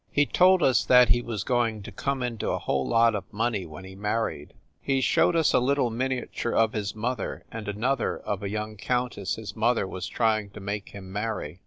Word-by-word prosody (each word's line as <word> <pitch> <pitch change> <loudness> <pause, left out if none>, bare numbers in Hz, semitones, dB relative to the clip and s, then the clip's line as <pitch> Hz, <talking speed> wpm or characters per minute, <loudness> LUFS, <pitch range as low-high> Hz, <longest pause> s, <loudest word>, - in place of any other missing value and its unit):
He 145 - +3
told 180 +2 +4
us 130 - +4
that 125 -1 +6
he 120 +3 +4
was 115 -4 -4
going 115 -4 0
to 110 - -8
come 135 +6 -2
into 120 -3 -2
a - - 0
whole - - -1
lot 115 -1 +4
of 100 -1 -5
money 110 -4 -1
when 80 +4 -10
he 95 - -10
married. 105 -7 -3 0.3
He 135 -1 +1
showed 170 +6 +3
us 165 -2 +3
a - - +5
little 130 -1 +1
miniature 125 -1 -2
of 115 -1 +3
his 105 -2 -3
mother 115 +1 -3
and 110 -2 -6
an 105 +2 -4
other 135 -2 +1
of 100 -1 -4
a 100 - -3
young 105 +1 -4
countess 125 -3 -1
his 105 -3 -8
mother 115 0 +2
was 95 0 -5
trying 110 -1 +1
to - - -6
make 100 0 -4
him 95 -2 -10
marry. 105 -5 -3
110 Hz, 215 wpm, -26 LUFS, 100-125 Hz, 0.3 s, that